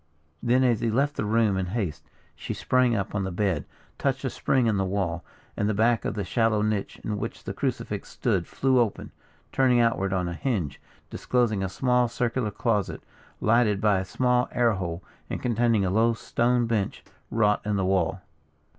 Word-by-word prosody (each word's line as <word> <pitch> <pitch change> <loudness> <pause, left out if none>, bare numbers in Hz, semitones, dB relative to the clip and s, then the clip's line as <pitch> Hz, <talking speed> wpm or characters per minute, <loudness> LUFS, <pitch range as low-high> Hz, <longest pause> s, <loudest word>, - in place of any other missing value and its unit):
Then, 125 +2 +3
as 120 -4 +3
he 115 - 0
left 140 +6 +1
the - - -2
room 110 -2 +2
in 95 -1 -1
haste, 90 -6 -4 0.3
she - - -5
sprang 125 -2 +2
up 100 -2 -2
on 100 -1 -1
the 95 - -2
bed, 95 0 -1 0.3
touched - - -1
a - - -1
spring 130 -3 +1
in 110 -3 +2
the 95 - +1
wall, 95 -3 -2 0.3
and 105 - 0
the 110 - 0
back 115 +1 +2
of - - -2
the 105 - -2
shallow 115 -2 +1
niche 105 -2 -2
in 105 -1 -3
which - - -5
the - - -5
crucifix - - -3
stood - - -1
flew 130 -1 +2
open, 115 -4 -1 0.4
turning 130 -2 +3
outward 115 -5 +1
on 90 -2 0
a 85 - -3
hinge, 85 - -2 0.3
disclosing 120 -5 0
a 95 - -1
small 125 +4 +2
circular 120 -1 -1
closet, 105 0 -1 0.4
lighted 110 -2 +3
by 105 -2 +3
a - - -2
small 125 +4 +1
air 120 -2 +3
hole, 90 -3 -4 0.3
and - - -3
containing 115 -3 +2
a 90 - 0
low 115 +3 +3
stone 120 +1 +1
bench, 110 -4 -2 0.3
wrought 105 -2 +2
in 105 -1 -1
the 95 -1 0
wall. 95 -1 +1
110 Hz, 190 wpm, -26 LUFS, 95-120 Hz, 0.4 s, Then